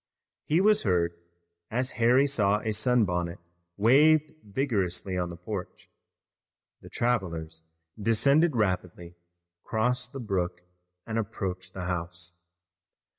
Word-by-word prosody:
He 160 +4 +2
was 210 +1 +4
heard, 85 -4 +1 0.6
as 125 +3 0
Harry 125 +4 +5
saw 105 -7 +2
a 110 - -2
sunbonnet 100 -6 +1 0.4
waved 150 +8 +4
vigorously 100 -5 -1
on 90 -1 -1
the 85 - -7
porch. 90 +1 -7 0.9
The - - -12
travelers 85 -9 -2 0.4
descended 140 +8 +3
rapidly, 90 -4 -2 0.5
crossed 125 +3 -1
the 135 - -7
brook, 90 -6 -2 0.4
and 115 0 -2
approached 95 -4 -5
the 95 -1 -4
house. 90 0 -5
105 Hz, 110 wpm, -28 LUFS, 90-125 Hz, 0.9 s, Harry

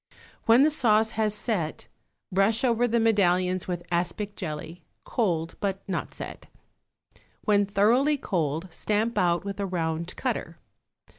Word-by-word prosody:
When 230 +4 +7
the 310 - +4
sauce 220 -6 +3
has 220 -1 0
set, 195 -9 -2 0.4
brush 195 +5 +2
over 245 -1 +3
the 235 0 +1
medallions 185 -4 +2
with 175 -1 -4
aspic 190 +4 -2
jelly, 160 0 -6 0.2
cold 170 -8 -1
but 195 -1 -3
not 185 -3 -3
set. - - -8 0.9
When 205 -1 +2
thoroughly 235 +9 +3
cold 165 - -2
stamp 215 +7 -1
out 175 0 +1
with 200 0 -5
a 200 - -1
round 170 -1 -2
cutter. - - -3
200 Hz, 135 wpm, -26 LUFS, 175-220 Hz, 0.9 s, When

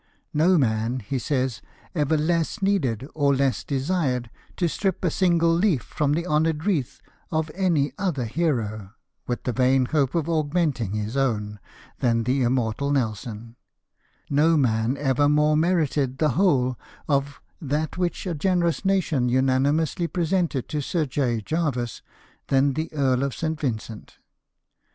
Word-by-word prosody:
No 175 +5 +4
man," 115 -1 0
he 130 +6 -3
says, 130 -4 -1 0.3
"ever 155 -1 +1
less 165 +5 0
needed, 140 - 0
or 140 -2 +2
less 135 -1 0
desired, 135 -4 -1 0.3
to 175 - +1
strip 190 +2 -1
a 170 - +2
single 170 -2 +3
leaf 170 - +2
from 145 -1 -1
the 170 +3 -1
honoured 160 -1 +1
wreath 145 - -1 0.3
of 160 -1 -1
any 165 -8 +1
other 170 -11 -1
hero, 110 - -2 0.3
with 120 - -3
the 125 - -1
vain 130 +1 +3
hope 140 +1 0
of 165 -2 0
augmenting 150 - 0
his 105 +3 -3
own, 105 -6 -1 0.4
than 115 -3 +2
the 130 +3 +1
immortal 125 +1 0
Nelson; 115 -3 -3 0.7
no 155 +3 +3
man 120 -1 +1
ever 145 0 +2
more 150 +1 +3
merited 150 -5 +1
the 155 +1 +2
whole 130 -6 +2 0.3
of 140 -1 0 0.2
that 150 +1 -2
which 180 +1 -2
a 180 - -2
generous 170 +2 0
nation 170 -10 +1
unanimously 135 +6 +1
presented 170 -6 -1
to 150 - -2
Sir 160 +3 -1
J. 130 -4 -1
Jervis 130 -4 -2 0.5
than 135 +1 +3
the 155 +4 -3
Earl 135 -4 +1
of 140 -1 -2
St. 160 -1 -2
Vincent." 115 -5 -5
140 Hz, 145 wpm, -24 LUFS, 125-165 Hz, 0.7 s, No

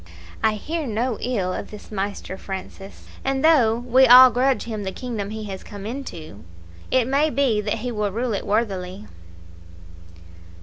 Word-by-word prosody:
I 220 - +3
hear 310 +8 -4
no 230 +1 -2
ill 200 -7 -1
of - - -6
this 210 0 -12
Maister 200 -2 -4
Francis; 195 +1 -9 0.2
and 270 +1 0
though 255 -9 +5
we 250 +2 +4
all 250 +1 +10
grudge 260 +2 +1
him 215 -3 -5
the 190 - -3
kingdom 220 -3 -5
he 220 0 -6
has 195 -2 -7
come 200 -1 -9
into, 175 - -7 0.5
it 255 -2 +2
may 280 +4 +2
be 260 -7 +1
that 210 0 -1
he 250 - -2
will 210 -3 -2
rule 235 +3 -2
it 200 - -4
worthily." 200 -2 -2
220 Hz, 165 wpm, -22 LUFS, 200-255 Hz, 0.5 s, all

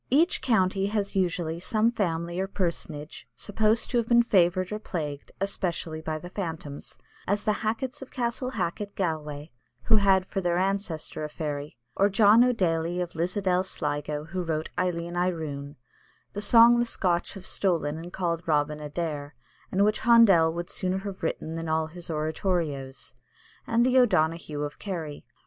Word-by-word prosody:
Each 315 +7 +3
county 195 -6 +2
has 205 -1 -2
usually 175 -3 0
some 215 +5 +1
family, 170 -5 -2
or 190 - 0
personage, 165 -5 -4
supposed 215 - 0
to 245 - +2
have 230 - -2
been 235 0 +5
favoured 185 -3 +2
or 210 - -3
plagued, 150 -8 -5
especially 170 -5 -2
by 160 0 -3
the 175 +3 -9
phantoms, 160 -7 -6 0.3
as 205 +2 +1
the 215 - +2
Hackets 230 +5 -2
of 270 - -8
Castle 250 0 -2
Hacket, 200 -3 -3
Galway, 155 -4 -3 0.3
who 220 - +5
had 195 -2 +4
for 195 - -3
their 175 -1 +1
ancestor 185 -5 -2
a 150 - -3
fairy, 145 -2 -5 0.2
or 200 +1 +3
John 210 +3 +6
o' 250 - +4
Daly 170 -5 0
of 175 -1 -3
Lisadell, 180 +2 0
Sligo, 150 -4 -3
who 180 +3 -4
wrote 160 -2 -2
"Eilleen 175 -1 -2
Aroon," 155 -5 -2 0.6
the 205 - -4
song 235 +2 +7
the 240 - +2
Scotch 180 -6 -1
have 190 -1 -9
stolen 160 -5 0
and 170 +2 -8
called 170 -3 -2
"Robin 150 -1 +1
Adair," 150 -1 -4 0.4
and 200 +2 +3
which 210 0 +1
Handel 215 -9 +6
would 175 +3 -5
sooner 185 -1 -1
have 195 -1 -6
written 160 -1 -3
than 165 -1 -4
all 160 0 +1
his 170 +2 -9
oratorios, 155 -5 -2 0.5
and 235 +1 +3
the 255 0 +5
"O'Donahue 160 -9 +1
of 145 0 -6
Kerry." 165 -7 -5
175 Hz, 165 wpm, -27 LUFS, 160-205 Hz, 0.6 s, song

